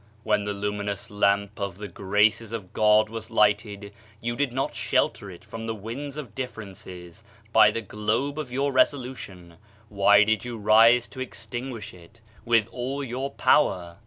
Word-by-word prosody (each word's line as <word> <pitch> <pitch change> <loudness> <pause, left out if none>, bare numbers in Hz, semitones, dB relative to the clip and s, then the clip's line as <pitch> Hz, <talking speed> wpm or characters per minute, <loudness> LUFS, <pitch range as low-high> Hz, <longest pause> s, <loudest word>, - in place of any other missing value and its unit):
When 105 -1 +1
the 105 - -2
lumi 105 0 -3
nous 100 -1 -5
Lamp 100 +1 +1
of 100 -3 -4
the 105 +1 -6
Graces 105 +4 +1
of 105 -6 -7
God 105 0 +4
was 110 0 -7
lighted, 105 -2 +1 0.3
you 120 +1 -3
did 140 0 0
not 130 +2 -2
shelter 100 - 0
it 90 -2 -12
from 115 0 -7
the 115 - -2
winds 130 +8 -7
of 130 -9 -7
differences, 95 -6 -8 0.3
by - - +7
the 115 - -3
globe 110 +8 -2
of 140 -5 -5
your 140 +3 0
resolution; 125 - -1 0.3
why 100 0 +5
did 110 -1 0
you 120 -1 -6
rise 115 +3 +5
to 115 - -11
extinguish 120 -1 -6
it 90 +6 -17 0.3
with 115 -2 +3
all 135 +3 -4
your 130 +2 -4
power?" 90 -12 +1
110 Hz, 165 wpm, -25 LUFS, 100-120 Hz, 0.3 s, by